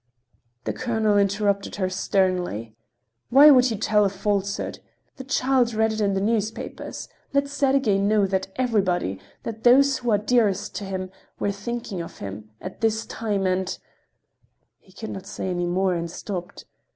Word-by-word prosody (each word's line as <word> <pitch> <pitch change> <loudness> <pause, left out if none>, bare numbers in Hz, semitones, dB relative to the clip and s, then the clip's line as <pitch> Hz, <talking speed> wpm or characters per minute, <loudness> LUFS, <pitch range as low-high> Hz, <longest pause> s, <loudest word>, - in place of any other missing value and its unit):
The - - -2
colonel 220 -4 0
interrupted 200 0 +1
her 190 -2 0
sternly: 180 - -1 0.5
"Why 280 +4 +9
should 250 - +1
you 225 - -2
tell 210 0 +3
a 200 - +3
falsehood? 200 +1 -2 0.4
The 265 - -7
child 255 -3 +1
read 220 0 +2
it 220 - -3
in 200 -1 +1
the - - +1
newspapers. 220 +1 -3 0.3
Let 280 0 +2
Sergey 270 -7 +2
know 205 +1 +3
that 190 0 -1
everybody—that 210 - -2
those 270 +2 +5
who 245 -2 -2
are 210 - +4
dearest 210 -2 +1
to 205 - -5
him—were 190 +1 -5
thinking 210 -2 -5
of 165 - -9
him—at 110 - -9
this 225 0 +1
time—and—" 190 -4 -1 1.0
He 190 - -23
could 215 +3 -7
not 190 0 -7
say 190 - -4
any 175 -1 -1
more 185 +1 +1
and 170 -1 -3
stopped. 180 +1 -6
200 Hz, 150 wpm, -24 LUFS, 185-225 Hz, 1.0 s, Why